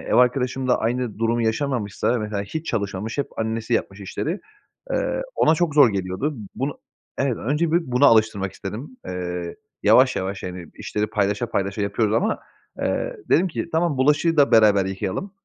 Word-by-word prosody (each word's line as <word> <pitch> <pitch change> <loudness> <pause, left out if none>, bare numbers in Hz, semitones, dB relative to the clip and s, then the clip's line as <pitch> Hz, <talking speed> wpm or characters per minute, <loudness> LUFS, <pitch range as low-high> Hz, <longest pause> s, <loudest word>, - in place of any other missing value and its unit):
ev - - -2
arkadaşım 125 +1 +2
da 125 - +3
aynı 120 -1 -2
durumu 115 +1 +1
yaşamamışti. 115 -2 -1
Mesela, 110 -4 0
hiç 160 +11 -6
çalışmamış, 105 +2 -3
hep 140 - 0
annesi 110 +1 -2
yapmış 100 -2 -2
işleri, 155 - -3 0.5
eee, - - 0
ona 160 - +4
çok 160 -2 0
zor 145 -4 +7
geliyordu. 100 +10 -2 0.2
Bunu, 135 +2 -3 0.4
evet, 130 -4 +1
önce 150 +6 0
bir 170 - +4
bunu 125 +3 +4
alıştırmak 110 -4 +3
istedim. 115 +7 -7
Iıı, 90 -1 -4 0.3
yavaş 130 0 +5
yavaş, 95 +1 -3
yani, 90 -2 -6
işleri 105 0 -2
paylaşa 105 +2 0
paylaşa 100 0 -1
yapıyoruz 105 +1 0
ama, 215 - +1 0.4
eee, - - -1
dedim 185 +2 +4
ki, 165 - -4
"Tamam, 160 -2 +1
bulaşığı 150 +4 +3
da 145 -1 +5
beraber 105 -4 +5
yıkayalım. 95 - -3
115 Hz, 165 wpm, -23 LUFS, 100-140 Hz, 0.5 s, zor